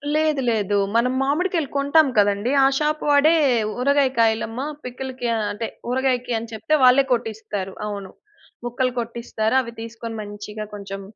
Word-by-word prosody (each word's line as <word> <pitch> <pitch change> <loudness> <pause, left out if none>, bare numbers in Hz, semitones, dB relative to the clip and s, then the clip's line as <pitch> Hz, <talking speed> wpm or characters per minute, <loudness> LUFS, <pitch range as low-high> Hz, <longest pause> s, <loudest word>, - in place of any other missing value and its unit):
లేదు, 310 -2 +2
లేదు 205 -2 0 0.2
మనం 245 +2 +2
మామిడికాయలు 315 +2 0
కొంటాం 285 +2 +4
కదండీ! 205 +3 +2
ఆ - - +6
షాప్ 305 0 0
వాడే 290 +3 +5 0.5
"ఊరగాయ 280 +1 +3
కాయలమ్మ 225 +1 +1 0.2
పికిల్‌కి" 250 -1 -5 0.2
అంటే 220 +2 -4 0.2
ఊరగాయకి 250 -1 0
అని 230 0 -9
చెప్తే 220 +8 0
వాళ్ళే 255 +2 +6
కొట్టిస్తారు 215 -4 -4
అవును. 200 -2 -6 0.5
ముక్కలు 250 +1 0
కొట్టిస్తారు. 230 0 -2
అవి 235 -2 -8
తీసుకొని 230 0 -7
మంచిగా 210 +1 -7
కొంచెం 195 -1 -7
240 Hz, 135 wpm, -22 LUFS, 220-270 Hz, 0.5 s, ఆ